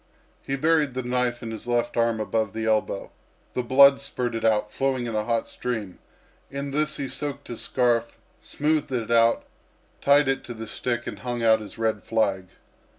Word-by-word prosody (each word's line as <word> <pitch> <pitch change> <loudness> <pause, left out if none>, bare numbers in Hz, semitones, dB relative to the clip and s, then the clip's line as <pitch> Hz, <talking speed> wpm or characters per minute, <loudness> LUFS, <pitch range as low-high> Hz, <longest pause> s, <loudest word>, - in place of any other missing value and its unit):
He 135 - -2
buried 150 -2 +2
the 130 - -2
knife 125 -1 -1
in 115 - -5
his 110 +1 -7
left 120 -1 0
arm 115 -1 +2
above 110 -1 -1
the 110 0 -3
elbow; 110 -2 0 0.4
the 125 - 0
blood 135 +3 +6
spurted 120 -4 -3
out, 105 -1 +2
flowing 135 -2 0
in 115 - -4
a 105 0 -1
hot 115 -1 0
stream. 110 -7 -4 0.5
In 140 0 -5
this 150 +1 0
he 140 - -3
soaked 140 +1 -5
his 120 - -4
scarf, 120 -2 +1 0.2
smoothed 150 -1 -1
it 115 -3 -2
out, 115 0 +4 0.6
tied 140 0 +5
it 135 0 0
to 120 - -7
the 115 0 -6
stick 120 +1 -3
and - - -6
hung 120 -1 -3
out 110 -1 +5
his 105 - -10
red 110 -1 0
flag. 100 -5 0
120 Hz, 185 wpm, -25 LUFS, 110-135 Hz, 0.6 s, blood